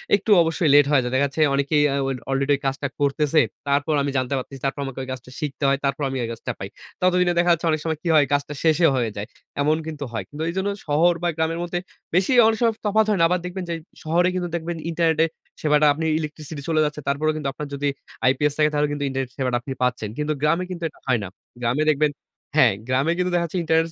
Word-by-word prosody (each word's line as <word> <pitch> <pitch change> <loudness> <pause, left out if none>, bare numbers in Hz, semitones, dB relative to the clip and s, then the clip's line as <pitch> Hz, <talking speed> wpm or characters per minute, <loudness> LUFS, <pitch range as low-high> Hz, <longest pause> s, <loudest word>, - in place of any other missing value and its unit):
একটু 205 +2 -1
অবশ্যই 165 -1 +1
লেট 145 -1 +7
হয়ে 145 -3 +5
যায়। 125 - -3
দেখা 140 +2 +3
যাচ্ছে 140 +3 -3
অনেকেই 140 +2 +2
আ - - 0
ওল 135 -1 -2
অলরেডি 135 +1 +1
ওই 140 - -7
কাজটা 135 +1 -2
করতেছে, 145 +2 +2 0.3
তারপর 140 +2 +1
আমি 140 - -1
জানতে 130 +1 -1
পারতেছি 135 +1 -6
তারপর 135 +1 -1
আমাকে 135 -1 -6
ঐ - - -6
কাজটা 125 0 -10
শিখতে 150 -2 -4
হয়, 135 0 +3
তারপর 140 +2 -1
আমি 135 - -3
ওই - - -2
কাজটা 115 +2 -5
পাই। 95 - -5 0.3
ততদিনে 180 -1 +3
দেখা 175 0 +3
যাচ্ছে 170 +1 -2
অনেক 155 - 0
সময় 160 -2 -1
কী - - -3
হয় 150 -2 +6
কাজটা 145 +1 0
শেষেই 160 0 +4
হয়ে 120 -3 0
যায়, 105 +1 -4 0.3
এমন 155 +2 +2
কিন্তু 150 -2 -5
হয়। 115 - -3
কিন্তু 150 +2 -5
এজন্য 190 +3 -1 0.2
শহর 160 +4 +4
বা - - +2
গ্রামের 165 +1 0
মধ্যে 175 0 -2 0.4
বেশি 185 +6 +3 0.2
অনেক 225 - +2
সময় 230 -1 +3
তফাত 215 +1 +3
হয় 210 - +2
না, 165 - +4
আবার 180 +1 +1
দেখবেন 180 +1 -4
যে 170 - -1 0.3
শহরে 170 +3 +2
কিন্তু 175 -1 -2
দেখবেন 170 0 -3
ইন্টারনেটে 160 -1 +2 0.4
সেবাটা 150 0 +3
আপনি 160 +3 -3
ইলেকট্রিসিটি 155 -1 -6
চলে 155 -1 +3
যাচ্ছে। 150 0 -4
তারপরেও 150 +3 +1
কিন্তু 140 -3 -2
আপনার 150 +3 -6
যদি 145 +1 0 0.4
আইপিএস 135 +3 +3
থাকে 155 0 +4
তাহলে 150 0 +2
কিন্তু 145 0 -3
ইন্টারনেট 135 -1 -3
সেবাটা 125 -2 0
আপনি 135 +1 -5
পাচ্ছেন। 120 -4 -1
কিন্তু 150 0 0
গ্রামে 165 +4 +2
কিন্তু 170 -1 -6
এটা - - -23
হয় 125 -3 +2
না। - - -4 0.3
গ্রামে 125 +6 +1
দেখবেন 150 0 +2 0.4
হ্যাঁ। - - +6
গ্রামে 135 +6 +1
কিন্তু 180 0 0
দেখাচ্ছে 170 +1 -1
ইন্টারনেট 160 0 +2
150 Hz, 230 wpm, -23 LUFS, 140-165 Hz, 0.4 s, লেট